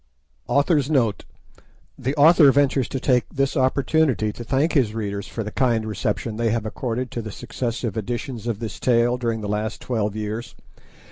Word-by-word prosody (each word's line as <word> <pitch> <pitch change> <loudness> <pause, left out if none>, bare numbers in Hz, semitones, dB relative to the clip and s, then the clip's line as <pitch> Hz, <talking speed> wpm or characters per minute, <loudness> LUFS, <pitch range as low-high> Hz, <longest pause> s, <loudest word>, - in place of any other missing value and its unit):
AUTHOR'S 145 -1 +2
NOTE 120 -9 +1 0.7
The 135 +4 -3
author 150 -1 +7
ventures 140 -2 +2
to 135 - -3
take 125 -3 +1
this 135 0 -1
opportunity 130 -4 +2
to 120 - -8
thank 135 +7 +1
his 120 -7 +2
readers 100 -2 -3
for 115 - -4
the 105 - -6
kind 115 -3 +1
reception 105 +1 -2
they 115 0 +1
have 115 0 -1
accorded 125 +3 -3
to 120 - -3
the 110 - -7
successive 115 -1 -4
editions 120 +2 -4
of 115 -3 -1
this 115 0 -6
tale 120 0 +2
during 115 -2 -1
the 105 - -4
last 105 +2 -2
twelve 110 -4 -2
years. 110 +2 -5
120 Hz, 175 wpm, -23 LUFS, 110-135 Hz, 0.7 s, author